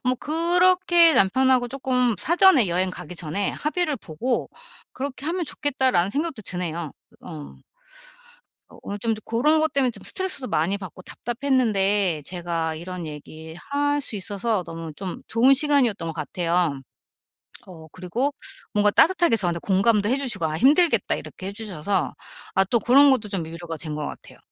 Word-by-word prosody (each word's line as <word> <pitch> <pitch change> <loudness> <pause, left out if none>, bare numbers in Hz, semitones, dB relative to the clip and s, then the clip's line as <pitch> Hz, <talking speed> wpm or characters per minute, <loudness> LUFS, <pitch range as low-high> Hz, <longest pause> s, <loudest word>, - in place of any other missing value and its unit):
뭐 250 0 +2
그렇게 345 +2 +4
남편하고 255 +5 +3
쪼끔 250 -2 0
사전에 330 - +4
여행 185 +2 0
가기 180 - -9
전에 175 +5 -2
합의를 305 -1 -1
보고 235 +6 -3 0.4
'그렇게 275 0 -6
하면 350 +2 -1
좋겠다.'라는 260 - 0
생각도 285 -2 -3
드네요. 170 -4 -4 0.3
으 - - -18
어. 155 -4 -10 1.1
어 - - -17
오늘 205 - -5
좀 225 +2 -1
고런 295 +8 +2
것 315 0 0
때문에 270 -3 +2
좀 - - -10
스트레스도 375 -9 -2
많이 175 +6 0
받고 185 -1 -10
답답했는데 210 - 0
제가 170 -1 -3
이런 175 +1 -7
얘기 155 +1 -10
할 290 - -1
수 250 -6 -4
있어서 205 +1 -2
너무 165 -1 -7
좀 190 0 -6
좋은 250 +4 +4
시간이었던 255 - +2
것 - - -3
같아요. 170 -5 -1 0.9
어 165 -4 -12
그리고 235 +11 -2 0.4
뭔가 210 -1 +3
따뜻하게 345 - +4
저한테 175 -4 -1
공감도 205 +3 +2
해 260 - +2
주시고 255 -11 -2
"아 155 0 -2
힘들겠다." 305 - +4
이렇게 185 - -8
해 200 - -5
주셔서 200 -3 -3 0.4
아 190 - +4
또 235 +5 +1
그런 275 +6 +6
것도 225 -5 0
좀 190 -5 -3
위로가 165 0 -7
된 155 0 -6
것 150 -1 -4
같아요. - - -10
210 Hz, 340 characters per minute, -23 LUFS, 175-275 Hz, 1.1 s, 그런